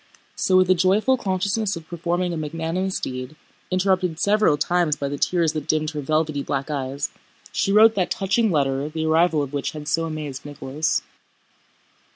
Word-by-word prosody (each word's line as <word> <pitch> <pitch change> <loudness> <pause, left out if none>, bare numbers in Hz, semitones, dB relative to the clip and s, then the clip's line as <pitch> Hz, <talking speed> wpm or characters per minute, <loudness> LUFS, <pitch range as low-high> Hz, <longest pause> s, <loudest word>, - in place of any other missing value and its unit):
So 185 - +2
with 185 0 +4
a - - +8
joyful 190 +8 +3
consciousness 200 -1 -1
of 165 -2 -9
performing 175 +1 -2
a - - -2
magnanimous 165 +5 -2
deed—interrupted 175 +7 -2
several 210 -7 +3
times 170 0 +1
by 140 - -3
the 145 - -4
tears 170 -3 +1
that 155 -2 -4
dimmed 155 0 +1
her 150 -2 -4
velvety 155 0 0
black 140 +1 -3
eyes—she 140 +7 -4
wrote 220 +2 +7
that 185 -4 0
touching 205 +4 +1
letter 140 -3 0
the 160 0 -3
arrival 160 -1 +3
of 140 0 -7
which 140 -1 -2
had 150 -1 -8
so 165 +1 +1
amazed 150 -4 -5
Nicholas. 145 +1 -2
160 Hz, 165 wpm, -23 LUFS, 150-185 Hz, -, a